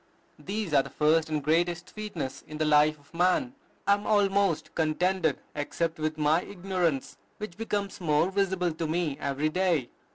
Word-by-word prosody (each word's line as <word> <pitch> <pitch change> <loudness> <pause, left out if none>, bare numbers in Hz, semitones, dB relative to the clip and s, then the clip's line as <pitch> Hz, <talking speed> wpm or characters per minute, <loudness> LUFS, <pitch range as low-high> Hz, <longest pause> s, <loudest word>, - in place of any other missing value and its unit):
These 200 -4 -3
are 140 - +6
the - - -9
first 155 +1 +2
and 150 -2 -1
greatest 170 +3 +1
sweetness 205 -11 -5
in 155 - -7
the 155 - +1
life 150 0 +4
of 145 +2 -25
man.... 185 +9 +2 0.3
I 200 - +5
am 205 +1 -2
almost 200 -5 +2
contented 160 0 +1 0.2
except 160 +3 -2
with 155 0 -1
my 155 +2 +3
ignorance, 180 -8 -2 0.2
which 210 -5 -6
becomes 205 -3 -3
more 160 +2 +2
visible 190 -3 +1
to 160 +1 -3
me 160 -3 -1
every 140 +2 0
day." 170 -7 +1
170 Hz, 165 wpm, -28 LUFS, 155-190 Hz, 0.3 s, are